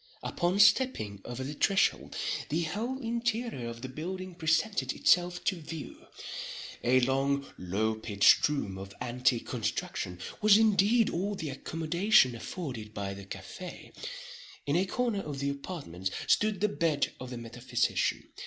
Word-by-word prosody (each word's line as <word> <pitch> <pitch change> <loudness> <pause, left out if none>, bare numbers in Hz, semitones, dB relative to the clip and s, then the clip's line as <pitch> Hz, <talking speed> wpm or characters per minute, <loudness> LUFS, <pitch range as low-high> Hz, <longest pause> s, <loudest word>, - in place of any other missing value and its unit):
Upon 180 +2 0
stepping 205 - +4
over 120 +2 -5
the 140 +3 -4
threshold, 195 +6 +2 0.3
the 165 +3 +1
whole 220 +11 -2
interior 230 - -2
of 115 +1 -8
the - - -3
building 185 +7 -5
presented 170 +5 +1
itself 175 0 +3
to 190 - +1
view. 155 -1 -8 0.8
A 130 +1 +4
long, 135 +2 +1
low 100 +5 0
pitched 110 +3 +4
room, 100 -10 -3
of 100 +1 -9
antique 125 0 +1
construction, 105 -6 -3 0.2
was 210 -1 +7
indeed 220 +1 +4
all 200 +4 -1
the 155 -6 -4
accommodation 165 - +3
afforded 115 -4 -6
by 100 -1 -3
the 100 0 -9
café. 100 - -8 0.7
In 145 - +1
a 185 +3 +2
corner 235 -2 0
of 145 -5 -5
the 140 +1 0
apartment 140 - -5 0.2
stood 210 -3 +2
the 210 - +4
bed 165 -7 0
of 130 - -7
the 125 - -6
metaphysician. 120 +1 -1
150 Hz, 145 wpm, -30 LUFS, 120-195 Hz, 0.8 s, was